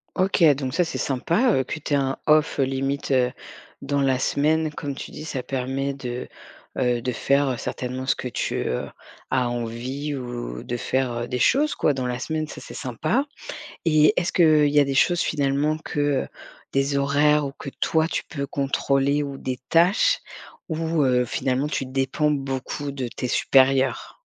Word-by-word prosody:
OK, 185 Hz, -2 st, +2 dB
donc 130 Hz, -2 st, -4 dB
ça 180 Hz, -, +3 dB
c'est 165 Hz, -, -4 dB
sympa, 170 Hz, -, +1 dB
heu, 130 Hz, -, +2 dB
que 150 Hz, -, -5 dB
tu 150 Hz, -, -3 dB
aies -, -, +5 dB
un 135 Hz, -1 st, 0 dB
off, 155 Hz, 0 st, +3 dB
heu, -, -, +5 dB
limite, 135 Hz, +1 st, -2 dB
heu, 125 Hz, -1 st, +3 dB, 0.5 s
dans 140 Hz, 0 st, 0 dB
la 135 Hz, -2 st, +2 dB
semaine, 155 Hz, +4 st, +1 dB
comme 145 Hz, -1 st, -4 dB
tu -, -, -7 dB
dis, -, -, -8 dB
ça 145 Hz, -5 st, -3 dB
permet 135 Hz, +2 st, -2 dB
de, 125 Hz, -2 st, -5 dB, 0.5 s
heu, 125 Hz, -2 st, +1 dB
de 125 Hz, +1 st, -1 dB
faire, 140 Hz, +3 st, +2 dB
heu, 125 Hz, -, -1 dB
certainement 130 Hz, +2 st, -4 dB
ce -, -, +2 dB
que -, -, -4 dB
tu, 125 Hz, -, -2 dB
heu, 60 Hz, -, -2 dB, 0.4 s
as 125 Hz, -2 st, +1 dB
envie 120 Hz, +5 st, -4 dB
ou 120 Hz, -, -5 dB
de 120 Hz, -, -4 dB
faire, 130 Hz, +1 st, -1 dB
heu, 120 Hz, 0 st, -3 dB
des 125 Hz, -, -2 dB
choses 295 Hz, -, +3 dB
quoi, 150 Hz, -, +2 dB
dans 130 Hz, -2 st, -2 dB
la 125 Hz, 0 st, -3 dB
semaine, 155 Hz, +3 st, -2 dB
ça -, -, -9 dB
c'est -, -, -10 dB
sympa. 150 Hz, -, -1 dB, 0.6 s
Et 155 Hz, -1 st, +5 dB
est-ce 175 Hz, -, -1 dB
qu'il 155 Hz, -4 st, +5 dB
y 145 Hz, 0 st, +4 dB
a -, -, +5 dB
des 135 Hz, 0 st, -2 dB
choses, 170 Hz, +5 st, +3 dB
finalement, 145 Hz, +1 st, 0 dB
que, 150 Hz, -, -4 dB, 0.2 s
heu, -, -, -12 dB, 0.5 s
des 140 Hz, +1 st, +1 dB
horaires 145 Hz, +1 st, +3 dB
ou 135 Hz, -, -5 dB
que 140 Hz, -, -6 dB
toi, 160 Hz, 0 st, +2 dB
tu -, -, -2 dB
peux 140 Hz, -3 st, -4 dB
contrôler 140 Hz, +1 st, +1 dB
ou 140 Hz, -1 st, -5 dB
des 130 Hz, -1 st, -4 dB
tâches, 195 Hz, -, +4 dB, 0.5 s
ou, 160 Hz, -1 st, 0 dB
heu, 125 Hz, -1 st, +3 dB
finalement 130 Hz, +4 st, -1 dB
tu 135 Hz, -, -2 dB
dépends 135 Hz, +3 st, 0 dB
beaucoup 135 Hz, 0 st, -3 dB
de 130 Hz, -3 st, -4 dB
tes 125 Hz, -, -4 dB
supérieurs? 135 Hz, 0 st, +2 dB
140 Hz, 190 wpm, -24 LUFS, 130-150 Hz, 0.6 s, aies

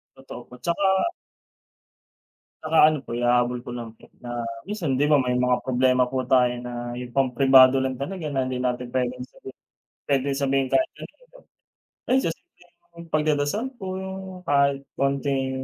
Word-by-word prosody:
Totoo 130 Hz, -2 st, -10 dB
po, -, -, -13 dB
tsaka 190 Hz, -, +1 dB, 1.5 s
Tsaka 160 Hz, +1 st, -1 dB
ano 155 Hz, -, -2 dB
po, 115 Hz, -, -5 dB
ihahabol 120 Hz, 0 st, +1 dB
ko 120 Hz, -, -9 dB
lang 115 Hz, -2 st, -7 dB
po -, -, -20 dB
na 120 Hz, -1 st, -5 dB, 0.2 s
minsan 170 Hz, -11 st, -2 dB
'di 145 Hz, -, +3 dB
ba 150 Hz, -, +4 dB
may 125 Hz, 0 st, 0 dB
mga 125 Hz, 0 st, +1 dB
problema 125 Hz, -1 st, +2 dB
po 130 Hz, -1 st, -2 dB
tayo 125 Hz, -1 st, +4 dB
na 120 Hz, 0 st, -6 dB
'yung 125 Hz, -1 st, -8 dB
pampribado 135 Hz, 0 st, +5 dB
lang 130 Hz, 0 st, -1 dB
talaga 155 Hz, +6 st, -5 dB
na 135 Hz, -, +1 dB
hindi 130 Hz, 0 st, -3 dB
natin 125 Hz, -1 st, -2 dB
puwedeng 125 Hz, 0 st, -2 dB
sabi -, -, -13 dB, 0.6 s
pwedeng 140 Hz, 0 st, +1 dB
sabihin 135 Hz, -1 st, +1 dB
kahit 325 Hz, 0 st, +2 dB
kanino. -, -, -14 dB, 0.7 s
Ayon 265 Hz, +1 st, +3 dB
sa -, -, 0 dB
simpleng 170 Hz, 0 st, -14 dB
pagdadasal 155 Hz, -, 0 dB, 0.2 s
po, -, -, -5 dB
'yung 190 Hz, 0 st, -6 dB, 0.3 s
kahit 140 Hz, -1 st, +2 dB
kaunting 135 Hz, -1 st, 0 dB
135 Hz, 155 wpm, -24 LUFS, 125-155 Hz, 1.5 s, pampribado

